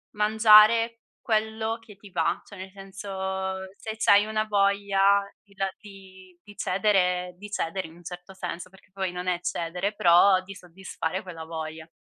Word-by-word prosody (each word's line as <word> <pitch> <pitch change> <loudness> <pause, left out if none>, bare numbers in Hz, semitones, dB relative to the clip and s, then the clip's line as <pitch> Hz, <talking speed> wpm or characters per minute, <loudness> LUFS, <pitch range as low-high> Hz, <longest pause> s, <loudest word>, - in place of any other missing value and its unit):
mangiare 220 +2 +6 0.2
quello 220 0 -1
che 220 -3 -15
ti 195 0 -15
va, 165 -2 0
cioè 200 - -13
nel 190 0 -9
senso 190 -1 -5 0.2
se 220 0 -6
c'hai 205 -1 +5
una 215 0 -1
voglia 200 -1 +3 0.2
di 205 - -24
la 195 0 -1
di 190 -3 -15
di 205 -1 -15
cedere 180 -2 +1
di 205 +2 -10
cedere 175 -2 -3
in 160 - -16
un 175 - -17
certo 180 +2 -9
senso, 180 -1 -6
perché 190 0 -21
poi 190 -1 -3
non 180 +1 -6
è 180 -1 0
cedere 180 +4 -2
però 185 +1 +5
di 195 +1 -11
soddisfare 180 -1 -5
quella 170 -4 -9
voglia. 160 0 -7
195 Hz, 165 wpm, -26 LUFS, 180-205 Hz, 0.2 s, mangiare